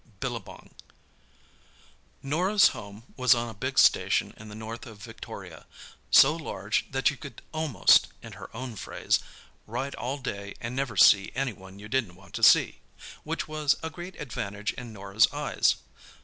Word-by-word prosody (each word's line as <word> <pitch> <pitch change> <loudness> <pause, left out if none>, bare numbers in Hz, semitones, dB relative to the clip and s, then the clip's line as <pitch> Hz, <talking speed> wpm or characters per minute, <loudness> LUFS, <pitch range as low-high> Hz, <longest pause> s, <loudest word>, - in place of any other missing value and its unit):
BILLABONG 120 -5 -6 1.5
Norah's 180 +9 +4
home 100 +2 -10
was 130 -1 +5
on 120 0 -2
a - - -8
big 100 - -4
station - - +4
in 110 0 -12
the 105 - -9
north 110 +4 -7
of 110 -2 -11
Victoria—so 135 +5 0
large 110 -10 -3
that 135 +2 +2
you 145 - -10
could 140 0 -11
almost, 155 - +4 0.2
in - - -9
her - - -10
own 125 -2 -6
phrase, - - -1 0.5
"ride 130 +5 -4
all 130 +3 -4
day 100 -7 -6
and 115 +2 -5
never 130 -6 -2
see 100 +1 +6
any 135 -4 -1
one 95 -1 -14
you 105 +1 -10
didn't 110 -7 -1
want 95 +1 -18
to - - -5
see"; - - +5 0.4
which - - -3
was 155 -2 +1
a 160 - -4
great 175 +3 -9
advantage 105 -7 -4
in 125 -2 -9
Norah's 100 +1 +2
eyes. - - +1
120 Hz, 160 wpm, -27 LUFS, 105-140 Hz, 1.5 s, see